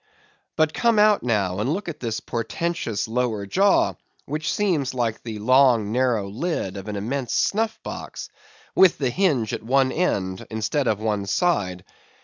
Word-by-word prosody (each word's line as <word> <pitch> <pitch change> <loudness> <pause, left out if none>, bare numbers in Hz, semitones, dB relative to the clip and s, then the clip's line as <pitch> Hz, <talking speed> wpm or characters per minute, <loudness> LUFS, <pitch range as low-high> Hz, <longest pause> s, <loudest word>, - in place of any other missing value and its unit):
But 155 -1 +2
come 235 -2 +2
out 210 -1 +5
now, 100 -6 0
and 115 +6 0
look 200 +4 -3
at 155 -3 -6
this 115 -2 -3
portentous 120 0 -3
lower 115 -3 -1
jaw, 195 - +3 0.3
which 155 +2 -2
seems 160 -11 0
like 115 -3 -1
the 110 -2 -6
long 120 -2 +4
narrow 120 -4 +1
lid 110 - -3
of 100 +1 -7
an 105 - -4
immense 120 +5 -3
snuff 220 +2 0
box, - - -7 0.4
with 190 -3 +5
the 130 -4 0
hinge 140 - +1
at - - -3
one 130 +3 +2
end, 95 - -1
instead 110 +5 -1
of 105 -2 +1
one 105 -2 -1
side. 95 - 0
125 Hz, 160 wpm, -23 LUFS, 105-160 Hz, 0.4 s, out